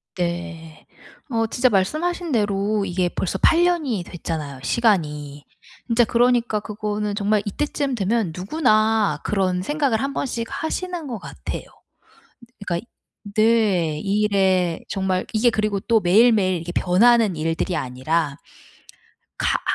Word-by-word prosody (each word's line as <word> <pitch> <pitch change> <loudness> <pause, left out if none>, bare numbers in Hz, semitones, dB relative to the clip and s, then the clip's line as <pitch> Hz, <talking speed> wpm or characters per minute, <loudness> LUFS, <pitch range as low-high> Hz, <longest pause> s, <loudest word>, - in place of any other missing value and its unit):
네. 170 -2 -5 0.4
어 225 -2 0
진짜 250 +3 +2
말씀하신 310 - 0
대로 205 -2 0
이게 180 -1 0
벌써 190 +2 -2
8 335 +1 +4
년이 295 - 0
됐잖아요 155 -6 -6
시간이. 150 - 0 0.4
진짜 235 0 +4
그러니까 240 -1 +2
그거는 210 -1 -3
정말 205 0 +1
이때쯤 280 +4 -2
되면 210 -3 0
누구나 215 - +2
그런 185 -3 0
생각을 275 -1 0
1 275 0 -2
번씩 230 -4 -3
하시는 335 +2 -4
것 235 -5 -5
같아요. - - -6 1.0
그니까 175 -3 -1
이 - - -10 0.5
네 210 -8 +2
이 205 +1 0
일에 190 -4 +2
정말 190 -2 -1
이게 235 +2 +4
그리고 215 -1 -1
또 225 +2 +2
매일매일 200 0 +4
이게 175 +1 -6
변하는 215 +2 +3
일들이 165 +3 -1
아니라 140 +4 -1 1.0
가 - - +2
아 - - -11
205 Hz, 270 characters per minute, -22 LUFS, 180-235 Hz, 1.0 s, 8